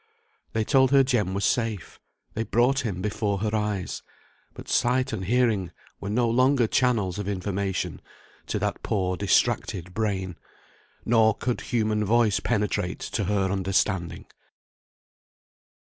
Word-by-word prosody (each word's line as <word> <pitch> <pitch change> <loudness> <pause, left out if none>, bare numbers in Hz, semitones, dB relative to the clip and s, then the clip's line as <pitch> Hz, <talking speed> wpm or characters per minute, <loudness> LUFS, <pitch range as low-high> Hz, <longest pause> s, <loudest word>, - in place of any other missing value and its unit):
They 110 - +1
told 130 +2 +4
her 135 0 +5
Jem 110 -8 0
was 100 +1 0
safe, 115 -7 -1 0.3
they 110 - -2
brought 120 +5 +2
him 95 -8 -3
before 105 -1 -1
her 110 0 0
eyes; 105 -4 -2 0.5
but - - -10
sight 125 +1 +1
and 95 -4 -3
hearing 110 -5 +1 0.3
were 100 - -5
no 120 +3 +1
longer 130 +2 +3
channels 110 -6 +1
of 100 - -4
information 100 -1 -2 0.5
to - - -1
that - - -2
poor 95 -3 -1
distracted 90 -1 0
brain, 95 -4 -2 0.7
nor 110 -2 +4
could 125 +1 -2
human 110 -3 0
voice 110 -1 +3
penetrate 105 -5 -1
to 105 - -2
her 95 -1 0
understanding. 95 -2 -1
105 Hz, 135 wpm, -25 LUFS, 95-120 Hz, 0.7 s, her